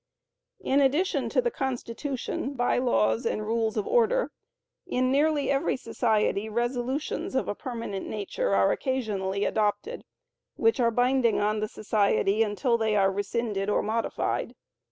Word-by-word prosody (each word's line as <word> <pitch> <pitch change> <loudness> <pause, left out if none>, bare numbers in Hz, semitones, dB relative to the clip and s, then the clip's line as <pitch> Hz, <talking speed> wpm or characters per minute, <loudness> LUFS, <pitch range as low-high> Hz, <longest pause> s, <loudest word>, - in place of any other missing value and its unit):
In 275 +2 +2
addition 295 +8 +1
to - - +1
the 480 - 0
Constitution, 265 - -3
By 245 0 +1
Laws 110 - +2
and 215 - -2
Rules 225 0 0
of 410 - 0
Order, - - +2 0.6
in 255 -6 +1
nearly 290 +1 +2
every 275 +2 +1
society 220 -3 0
resolutions 245 +5 -2
of 260 - 0
a - - -1
permanent 230 -4 -5
nature 200 - -2
are 100 0 +4
occasionally 205 -7 -1
adopted, 215 - -1 0.5
which 455 -10 +2
are 235 -2 +4
binding 245 0 +2
on 210 +1 +1
the 215 - -1
society 210 -1 +1
until 230 +3 +1
they 220 -1 +1
are 195 -1 +3
rescinded 205 0 -2
or - - +1
modified. 225 +2 -2
235 Hz, 140 wpm, -27 LUFS, 210-265 Hz, 0.6 s, are